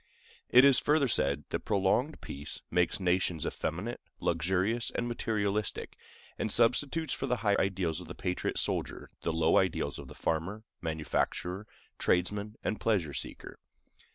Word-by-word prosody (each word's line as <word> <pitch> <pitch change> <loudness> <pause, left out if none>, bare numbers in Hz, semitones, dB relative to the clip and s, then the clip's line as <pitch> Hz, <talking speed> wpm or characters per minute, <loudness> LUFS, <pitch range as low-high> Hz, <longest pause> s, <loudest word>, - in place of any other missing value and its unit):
It 125 +2 +8
is 140 -2 +7
further 150 -2 +3
said 70 - +1
that - - -1
prolonged 105 +8 +1
peace 70 +2 -3
makes 90 0 +2
nations 90 -3 +1
effeminate, - - -3 0.2
luxurious, 95 +6 +1
and 120 - -2
materialistic, 105 -3 -1 0.4
and 110 - 0
substitutes 140 +8 +2
for 135 - -3
the 125 - +2
high 100 -1 +4
ideals 90 -3 0
of 90 - -10
the 90 - -7
patriot 90 -1 -2
soldier - - -2
the 85 - 0
low 80 0 +3
ideals 95 -3 -1
of - - -9
the - - -11
farmer, 90 +7 -2 0.2
manufacturer, 85 +4 -2 0.3
tradesman, 100 +4 0
and 110 - -1
pleasure 95 -10 +1
seeker. - - -6
95 Hz, 145 wpm, -31 LUFS, 85-115 Hz, 0.4 s, It